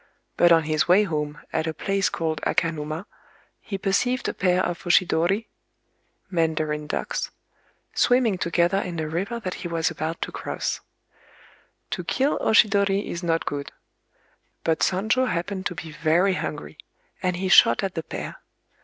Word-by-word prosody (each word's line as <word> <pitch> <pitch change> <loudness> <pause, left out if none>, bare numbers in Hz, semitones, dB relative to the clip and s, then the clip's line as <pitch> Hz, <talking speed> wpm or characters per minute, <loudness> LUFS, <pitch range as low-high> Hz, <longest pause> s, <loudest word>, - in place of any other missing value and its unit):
But 175 - +5
on 165 -1 +6
his 155 0 +1
way 185 +4 +6
home, 150 -5 -3
at 160 0 0
a 160 - -3
place 195 0 0
called 160 -2 -2
Akanuma, 160 +1 -1 0.5
he 195 - -5
perceived 235 +7 0
a - - -1
pair 180 0 +2
of 175 -1 -3
oshidori 185 +3 +2 0.9
(mandarin 155 -3 0
ducks), - - -2 0.6
swimming 245 -7 +3
together 170 +3 +2
in 175 -4 -4
a 155 - -2
river 195 +9 -3
that 185 -5 -4
he 180 - -3
was 165 -1 0
about 160 +1 -4
to - - -5
cross. - - -3 1.1
To - - -2
kill 275 +3 +1
oshidori 200 -2 +3
is 170 - -4
not 165 -2 0
good; 140 -1 -4 0.9
but 160 -1 +1
Sonjō 220 +7 +2
happened 185 +2 -2
to 180 - -7
be 165 -2 -7
very 170 +5 +2
hungry, 150 -3 -5 0.4
and 180 -1 0
he 190 +2 -2
shot 120 -9 +6
at 195 -2 -2
the 165 - -2
pair. - - -6
175 Hz, 155 wpm, -24 LUFS, 160-195 Hz, 1.1 s, on